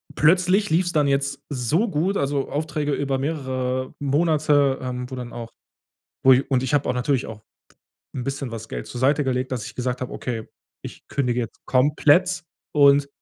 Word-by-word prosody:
plötzlich 185 +5 +3
lief's 175 +2 +1
dann 150 -2 +3
jetzt 140 0 0
so 145 - 0
gut, 180 +4 0
also, 140 0 -1
Aufträge 150 -1 -2
über 135 -1 -1
mehrere 130 -3 -2
Monate, 145 -1 +2
ähm, 125 0 -4
wo 130 - -6
dann 125 -2 -7
auch, 115 -1 -7 0.7
wo 130 0 +8
ich 135 +2 +1
und 130 -1 +3
ich 130 - -2
habe 145 - +2
auch - - +1
natürlich 125 +1 0
auch 105 -1 -9 0.7
'n 125 - -3
bisschen 135 -2 -4
was 110 -1 -7
Geld - - -5
zur 120 - -7
Seite 145 +3 +3
gelegt, 130 0 -1
dass 120 -4 -3
ich - - -9
gesagt 125 0 -2
habe: 130 - -4
„Okay, 115 -3 -5 0.3
ich - - -10
kündige 125 -3 -1
jetzt 115 - -8
komplett 150 +7 +3 0.3
und 140 -1 +5
135 Hz, 180 wpm, -23 LUFS, 125-150 Hz, 0.7 s, wo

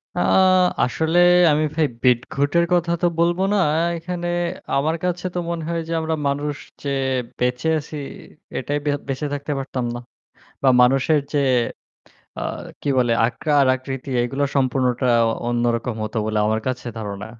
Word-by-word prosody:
অ্যাঁ 185 -1 +4 0.2
আসলে 160 +7 +1 0.3
আমি 150 +1 +2
ভাই 160 -2 +3 0.2
বিটঘুটের 140 +6 +2
কথা 170 -1 +2
তো 175 - +4
বলব 170 +1 +2 0.2
না। - - +2
অ্যাঁ 165 +3 +1
এখানে 175 +1 -4 0.5
আমার 155 +4 +1
কাছে 180 0 -2
তো - - 0
মনে 170 -1 -3
হয় 170 -1 -1
যে, - - -6
আমরা 160 0 -1
মানুষ 145 +1 -1 0.3
যে 140 - -2 0.5
বেঁচে 125 +4 0
আছি 150 +1 -9 0.6
এটাই 145 +3 -2
বে 145 - +2 0.2
বেঁচে 135 +2 -2
থাকতে 145 +1 -4
পারতাম 130 -2 -3
না - - -5 0.6
বা 135 - +5
মানুষের 135 +5 +4
যে 145 - +2 1.0
অ্যাঁ - - -4 0.2
কি - - -4
বলে 120 -2 +2
আকার 140 +5 +1
আকৃতি 135 +1 -6
এগুলো 135 +4 -1
সম্পূর্ণটা 130 -1 +1 0.4
অন্যরকম 120 0 0
হতো 110 +2 -6
বলে 110 0 -1
আমার 110 +1 +1
কাছে 130 -1 -3
ধারণা। 105 -1 -5
140 Hz, 150 wpm, -21 LUFS, 125-160 Hz, 1.0 s, বা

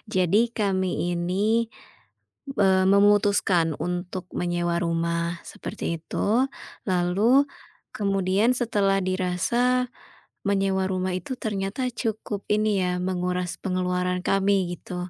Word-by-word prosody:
jadi 185 +3 +4
kami 185 -4 0
ini, 205 +7 +1 0.8
b 275 -1 -7
eee, 190 -1 +4
memutuskan 200 -4 +4
untuk 180 +1 -4
menyewa 175 -1 0
rumah, 170 0 -1
seperti 165 - -5
itu. 225 +9 +1 0.4
Lalu, 195 +10 +3 0.5
kemudian 195 +2 +2
setelah 205 -5 +1
dirasa 235 +8 +1 0.6
menyewa 195 -1 +1
rumah 185 0 -1
itu 260 +8 -5
ternyata 205 +4 -2
cukup 220 -3 -4
ini 210 -2 +2
ya, 180 0 -1
menguras 180 -1 -2
pengeluaran 180 -1 -1
kami 195 -2 +2
gitu. 180 +1 -6
190 Hz, 105 wpm, -25 LUFS, 180-205 Hz, 0.8 s, jadi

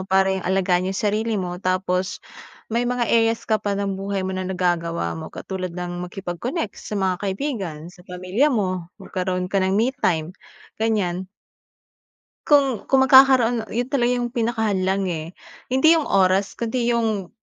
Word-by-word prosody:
paring 190 0 +2
yung 180 - -4
alagaan 185 -1 +1
iyong 195 - -3
sarili 215 +1 0
mo 180 -1 -4
tapos, 185 0 -1 0.6
may 240 +1 +1
mga 245 -1 0
areas 225 0 +2
ka 220 -1 +1
pa 200 -1 -1
ng 200 -1 -1
buhay 195 -1 -2
mo 190 - -2
na 185 0 -3
nagagawa 175 -2 -1
mo, 160 0 -7
katulad 185 -2 -6
ng 180 0 -4
makipag-connect 195 - -4
sa 210 - -5
mga 190 -2 +1
kaibigan, 195 - -3
sa 185 - -17
pamilya 185 +10 +1
mo, 185 - -1
magkaroon 185 -1 -3
ka 195 - +3
ng 190 +1 +1
me 235 +5 +2
time 160 -1 0 0.5
ganyan. 190 -5 0 1.2
Kung 275 -6 +3
kung 265 -1 +4
magkakaroon, 255 -4 +6
iyon 245 +2 -1
talaga 250 -4 +2
iyong 240 -1 -2
pinakahadlang, 205 -6 0
eh. 160 -2 -4 0.4
Hindi 315 +6 +4
iyong 300 - -2
oras, 190 +1 +2
kundi 235 +1 -2
iyong 220 -6 0
195 Hz, 160 wpm, -22 LUFS, 185-235 Hz, 1.2 s, magkakaroon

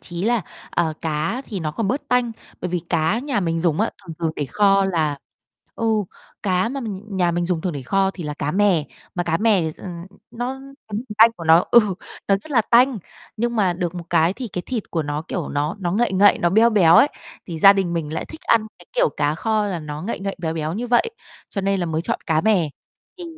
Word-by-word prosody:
chí 175 +1 -5
là, 230 -2 +2 0.3
ờ, 165 -2 0
cá 160 - -1
thì 200 -5 -5
nó 155 -2 -2
còn 210 +4 -2
bớt 265 +6 -2
tanh. 250 -2 +2 0.3
Bởi 180 - -3
vì 180 - 0
cá 165 +5 +1
nhà 260 -4 -1
mình 165 -2 -1
dùng 165 -1 +1
á, 225 - +1 0.2
thường 165 - -7
thường 165 -2 0
để 145 - -1
kho 195 +6 +3
là 155 -6 0 0.6
ừ, 230 - -4 0.6
cá 185 0 +1
mà 275 +3 -4
mình 205 -6 -5
nhà 175 -2 +2
mình 175 +1 -1
dùng 175 -2 0
thường 180 +1 -2
để 140 -3 -5
kho 195 +8 +1
thì 175 - -7
là 150 -1 -4
cá 145 - -2
mè, 190 -4 +2 0.3
mà 175 - 0
cá 165 -1 +1
mè 210 0 +3
thì 160 -1 -1
s - - -15
ờ, - - -7 0.4
nó 250 +3 -4 0.3
cái 210 - -7
mùi 225 - -4
tanh 225 +1 +8
của 170 - -8
nó 165 +2 +6
ừ, 235 - +8 0.5
nó 195 - +5
rất 205 +11 -13
là 250 -5 +4
tanh, 240 +1 +4 0.4
nhưng 235 +1 -1
mà 190 -4 +3
được 175 -1 -3
một 175 -1 -6
cái 165 +3 +3
thì 245 +2 -6
cái 180 -1 -5
thịt 240 -5 -4
của 165 - -1
nó, 145 +1 -3
kiểu, 175 - -3
nó 150 +6 -2
nó 175 -2 -1
ngậy 230 0 +1
ngậy, 200 +2 +5
nó 175 - +2
beo 225 +5 +5
béo 175 -6 +5
ấy, 285 - +7 0.4
thì 170 -3 -5
gia 195 +4 +9
đình 190 -3 -1
mình 155 -3 -3
lại - - -3
thích 315 - -11
ăn 225 -2 +2
cái, - - -17
kiểu, - - +3
cá 145 0 +1
kho 215 +3 0
là 190 -4 -2
nó 150 0 -6
ngậy 210 0 -4
ngậy 195 0 -3
béo 165 -2 -3
béo 155 -1 -2
như 230 +7 -3
vậy, 245 - +2 0.4
cho 200 - -3
nên 195 0 0
là 175 - -1
mới 160 0 -2
chọn - - -2
cá 155 -1 +2
mè, 185 -8 +2 0.5
thì 355 - -7
185 Hz, 250 wpm, -22 LUFS, 165-220 Hz, 0.6 s, gia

